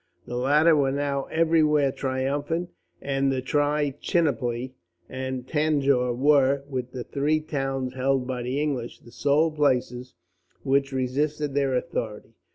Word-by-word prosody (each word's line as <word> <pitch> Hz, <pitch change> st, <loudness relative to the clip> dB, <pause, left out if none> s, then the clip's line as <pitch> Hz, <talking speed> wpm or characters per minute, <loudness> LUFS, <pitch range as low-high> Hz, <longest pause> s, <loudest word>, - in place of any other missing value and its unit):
The 120 Hz, -, -6 dB
latter 150 Hz, +6 st, +4 dB
were 140 Hz, -2 st, +2 dB
now 140 Hz, 0 st, -1 dB
everywhere 155 Hz, -3 st, +2 dB
triumphant, 145 Hz, +6 st, -2 dB, 0.3 s
and 135 Hz, 0 st, 0 dB
Trichinopoli 140 Hz, -2 st, 0 dB, 0.3 s
and 130 Hz, -1 st, -5 dB
Tanjore 140 Hz, -5 st, +1 dB
were, 140 Hz, 0 st, +3 dB
with 130 Hz, -3 st, -4 dB
the 125 Hz, -2 st, -5 dB
three 150 Hz, +4 st, 0 dB
towns 135 Hz, -4 st, -3 dB
held 130 Hz, 0 st, 0 dB
by 125 Hz, -1 st, -3 dB
the 125 Hz, +3 st, -2 dB
English, 135 Hz, -6 st, -3 dB
the 120 Hz, -, -16 dB
sole 145 Hz, +5 st, +2 dB
places 125 Hz, -4 st, 0 dB, 0.5 s
which 135 Hz, 0 st, +1 dB
resisted 145 Hz, +3 st, -1 dB
their 135 Hz, -2 st, +1 dB
authority. 120 Hz, -7 st, -4 dB
135 Hz, 125 wpm, -25 LUFS, 130-150 Hz, 0.5 s, latter